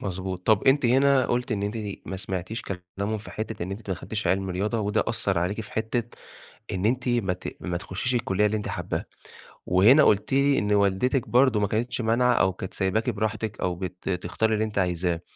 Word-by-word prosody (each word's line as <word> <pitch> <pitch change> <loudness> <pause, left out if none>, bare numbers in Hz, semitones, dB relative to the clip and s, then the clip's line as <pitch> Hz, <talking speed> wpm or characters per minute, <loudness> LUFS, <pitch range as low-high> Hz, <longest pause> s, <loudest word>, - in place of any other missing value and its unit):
مضبوط، 95 -1 -5
طَب 110 -2 +4
أنتِ 135 -1 +4
هنا 135 +2 +4
قلُتِ 125 0 -1
إن 100 -2 -1
أنتِ 105 +2 -2 0.3
ما 95 - -4
سمعتيش 95 +4 -4
كلامهم 100 +3 -4
في 105 - -10
حتّة 110 -4 -5
إن 90 - -4
أنتِ 100 +1 -7
ما 95 - 0
دخلتيش 100 +6 -5
علم 95 0 +1
رياضة، 105 +5 -1
وده 105 +1 +1
أثّر 110 -5 0
عليكِ 90 +6 -1
في 105 - -10
حتّة 110 +2 -1 0.7
إن 95 +2 0
أنتِ 125 +2 0
ما 120 -6 +1
ت 90 - -7
ما 90 -1 -2
تخشيش 95 +8 -3
الكلية 105 -3 +1
اللي 105 +1 0
أنتِ 105 - -4
حاباها، - - -3 0.6
وهنا 110 +12 +6
قُلتِ 105 +3 +2
لي 140 0 +4
إن 105 0 0
والدتِك 100 +6 +2
برضه 125 -2 +4
ما 100 - +1
كانتش 120 +4 -1
مانعة 120 +2 +3
أو 95 -5 +2
كانت 95 +1 -7
سايباكِ 105 +5 0
براحتِك 110 -1 -3
أو 90 -1 0
بت 90 +1 -6
تختاري 100 +4 0
اللي 110 0 +1
أنتِ 105 -2 -7
عايزاه. 90 -2 0
105 Hz, 205 wpm, -26 LUFS, 95-115 Hz, 0.7 s, وهنا